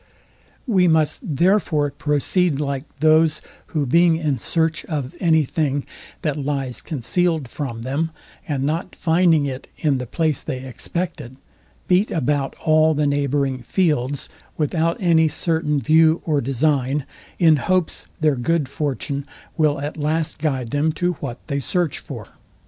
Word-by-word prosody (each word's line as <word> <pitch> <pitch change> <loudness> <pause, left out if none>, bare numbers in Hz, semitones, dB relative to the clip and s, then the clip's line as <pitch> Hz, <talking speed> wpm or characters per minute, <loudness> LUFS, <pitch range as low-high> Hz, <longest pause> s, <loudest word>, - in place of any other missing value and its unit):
We 190 -8 +3
must, 160 -2 +2 0.2
therefore, 165 -4 +2
proceed 150 +2 +1
like 140 -1 -2 0.2
those, 155 0 +4 0.3
who 150 -4 -1
being 170 +5 +4
in 150 -6 -1
search 160 +5 0
of 145 -4 -4
any 160 -3 +4
thing, 145 -1 -1 0.4
that 150 -3 -1
lies 135 -3 -2
concealed 160 +2 0
from 120 -3 -5
them, 140 +6 -1 0.4
and 140 -3 -1
not 160 +5 -2
finding 165 -2 +3
it 130 -1 -5
in 145 -4 +1
the 125 - -5
place 155 +1 0
they 130 0 -5
expected, 130 0 -4 0.5
beat 185 +4 +3
about 145 -3 -1
all 155 0 +4
the 150 0 +1
neighbouring 140 -2 0
fields, 145 - 0 0.3
without 165 +2 0
any 165 -3 +4
certain 160 -2 0
view 160 +4 +4
or 150 -3 +1
design, 135 +1 0 0.3
in 160 -3 +5
hopes 180 +5 0
their 155 -2 +3
good 145 +4 0
fortune 140 0 -3 0.3
will 150 -3 +2
at 145 +3 -5
last 155 +1 -1
guide 135 -6 -1
them 145 +5 +1
to 180 +2 0
what 125 -3 -5
they 140 -2 -2
search 175 +3 -1
for. - - -8
150 Hz, 145 wpm, -21 LUFS, 140-165 Hz, 0.5 s, in